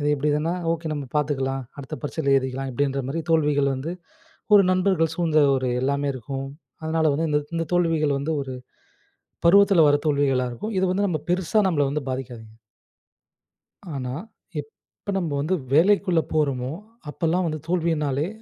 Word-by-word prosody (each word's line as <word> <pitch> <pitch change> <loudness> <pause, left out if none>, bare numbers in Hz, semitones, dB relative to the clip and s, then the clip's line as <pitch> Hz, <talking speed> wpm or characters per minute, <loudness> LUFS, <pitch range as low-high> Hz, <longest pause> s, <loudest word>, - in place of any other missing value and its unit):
"இது 145 - 0
இப்டி 145 +1 -1
இதுன்னா 155 +3 0 0.2
ஓகே 165 -1 -4
நம்ம 145 -2 -5
பார்த்துக்கலாம். 135 -2 -1 0.2
அடுத்த 140 +2 -6
பரீட்சையில 145 -1 -1
எழுதிக்கலாம்" 130 0 -2
அப்படின்ற 140 +1 0
மாரி 165 +4 -2
தோல்விகள் 145 -3 +3
வந்து, 135 +6 -4 0.6
ஒரு 200 - +7
நண்பர்கள் 185 -4 +2
சூழ்ந்த 160 -3 +3
ஒரு 130 -1 -1
எல்லாமே 140 +2 0
இருக்கும். 135 +2 -5 0.4
அதனால 160 0 0
வந்து, 160 +2 0
இந்த 150 - +3 0.2
இந்த 165 0 -1
தோல்விகள் 160 -5 +2
வந்து 155 +3 -2
ஒரு 130 -1 -7 0.9
பருவத்தில 200 -1 +6
வர்ற 145 0 +3
தோல்விகளா 140 -3 +2
இருக்கும். 215 - -5
இது 190 - +2
வந்து 200 +2 +1
நம்ம 165 -5 -1
பெருசா 185 +4 +2
நம்மள 150 -6 +2
வந்து 150 0 -2
பாதிக்காதுங்க. 120 -4 -6 1.4
ஆனா 125 -2 -4 0.5
எப் 145 0 -7 0.4
ப 200 - 0
நம்ப 170 -5 -2
வந்து 165 +6 +1 0.2
வேலைக்குள்ள 180 +1 +4
போறோமோ, 135 -5 0 0.4
அப்பலாம் 170 +4 0
வந்து 155 -1 -3
தோல்வியினாலே 160 -4 0
150 Hz, 155 wpm, -24 LUFS, 135-165 Hz, 1.4 s, ஒரு